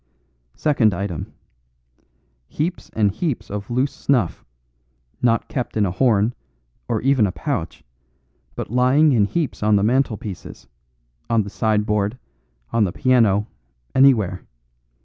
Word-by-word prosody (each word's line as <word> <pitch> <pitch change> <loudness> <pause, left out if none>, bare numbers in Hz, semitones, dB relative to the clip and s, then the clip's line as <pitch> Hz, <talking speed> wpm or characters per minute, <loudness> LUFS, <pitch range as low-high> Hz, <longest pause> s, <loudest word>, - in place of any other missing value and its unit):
"Second 120 - +2
item. 90 -3 -4 1.2
Heaps 165 - -3
and 105 -2 +2
heaps 145 - -3
of 100 0 -5
loose 130 +4 0
snuff, 125 -11 0 0.8
not 115 -2 +2
kept 125 -4 -4
in 105 - +3
a 90 - -1
horn, 110 +1 +2 0.5
or 115 -3 -1
even 130 -5 +3
a - - -2
pouch, 85 -3 -4 0.7
but - - -5
lying 130 +5 +4
in 110 -6 +3
heaps 155 +5 -2
on 105 0 +3
the 100 - +2
mantelpieces, 110 - -2 0.6
on 115 -2 +2
the 100 - -8
sideboard, 105 +1 0 0.6
on 115 -2 +3
the 95 - 0
piano, 110 -5 +3 0.5
anywhere. 110 -9 +4
110 Hz, 125 wpm, -21 LUFS, 100-130 Hz, 1.2 s, lying